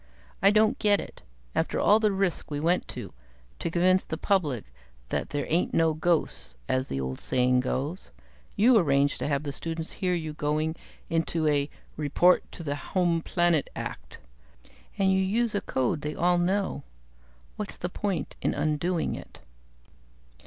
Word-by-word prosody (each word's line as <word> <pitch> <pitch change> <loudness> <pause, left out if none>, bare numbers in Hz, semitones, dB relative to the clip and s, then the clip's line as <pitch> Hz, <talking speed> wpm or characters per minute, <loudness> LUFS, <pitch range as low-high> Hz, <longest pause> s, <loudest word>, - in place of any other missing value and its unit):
"I 195 - +7
don't 215 +5 +3
get 205 -1 +4
it. - - -9 0.3
After - - 0
all 210 +2 +5
the 215 -2 +3
risk 195 -3 -1
we 145 -1 -3
went 170 +4 +1
to, - - -7 0.5
to 170 - -2
convince 185 +2 +3
the 160 - -5
public 145 - 0 0.4
that - - -2
there 145 -1 -2
ain't 170 +3 +1
no 165 -1 +3
ghosts 160 - 0
as 130 0 0
the 70 - -3
old 65 0 -3
saying 125 0 +2
goes 140 +7 -3 0.5
you 235 +3 +6
arrange 140 -4 +2
to - - -2
have 145 0 -1
students 165 +1 -4
hear 180 -3 -1
you 160 -3 -4
going 155 +2 -1 0.4
into 165 -1 +1
a 145 -1 +2 0.3
'report 155 +5 +3
to 170 - -7
the 145 -2 -2
home 170 +3 0
planet' 175 -3 +1
act. - - -6 0.8
And 195 -1 +3
you 190 - +3
use 215 +4 +1
a 205 - 0
code 130 +3 -1
they 150 +1 -4
all 175 +1 +3
know. 190 +3 0 0.7
What's - - -5
the 180 - -3
point 180 -4 -3
in - - 0
undoing 155 +4 0
it?" - - -10
165 Hz, 160 wpm, -27 LUFS, 145-185 Hz, 0.8 s, I